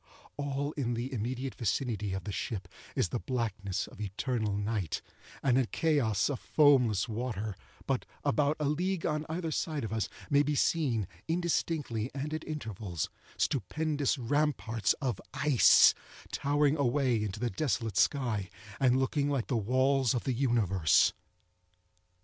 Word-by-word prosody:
All 145 0 -2
in 120 -6 -2
the 125 +4 -4
immediate 125 +3 -3
vicinity 105 -3 -1
of 95 - -3
the 105 - -4
ship 100 -2 -4 0.3
is - - +1
the 120 - -2
blackness 105 -7 -2
of - - -12
eternal 105 +1 -1
night, 105 -5 -2 0.4
and 130 -1 +4
a 130 - +1
chaos 135 -12 +1
of 140 -4 -2
foamless 125 -10 +4
water; 110 -3 -3 0.3
but, - - -1 0.2
about 145 +5 +2
a 150 - 0
league 175 +5 0
on 150 -1 -1
either 165 0 -2
side 155 -2 -2
of 110 -1 -3
us, 110 -1 -1 0.2
may 145 -2 +4
be 145 +1 0
seen, 130 - +1 0.2
indistinctly 160 -8 -1
and 145 +3 -3
at 155 - -3
intervals, 110 - -4 0.3
stupendous 145 - 0
ramparts 125 -5 +1
of 125 -9 -3
ice, 145 -5 +6 0.4
towering 145 +1 +2
away 130 -4 +2
into 105 0 -4
the 120 0 -1
desolate 115 -3 -1
sky, 110 -9 +1 0.3
and 130 -1 +4
looking 140 +2 +1
like 135 -5 -1
the 125 - +1
walls 130 +3 +2
of 120 - -1
the 130 - 0
universe. 110 - +3
125 Hz, 145 wpm, -31 LUFS, 110-145 Hz, 0.4 s, ice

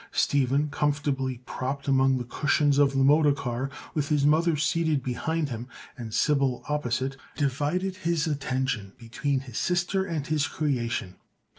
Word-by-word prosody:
Stephen, 140 +1 +2
comfortably 140 -4 -1
propped 140 +2 -4
among 135 -1 +3
the 125 - -3
cushions 145 +2 +2
of 140 -1 +4
the 135 0 +2
motor 150 +2 +5
car 130 -1 -3 0.2
with 145 -2 -1
his 145 -2 +2
mother 160 +2 +3
seated 155 -1 +1
behind 150 +5 -1
him 120 0 -5 0.3
and 115 -3 -7
Sybil 135 0 +1
opposite, 135 -2 -1 0.2
divided 150 +7 -1
his 170 -5 0
attention 130 -8 -2
between 130 +3 -2
his 125 -4 -6
sister 180 +2 +1
and 165 -7 -3
his 150 -2 0
creation. 120 -10 -2
140 Hz, 145 wpm, -27 LUFS, 130-150 Hz, 0.3 s, motor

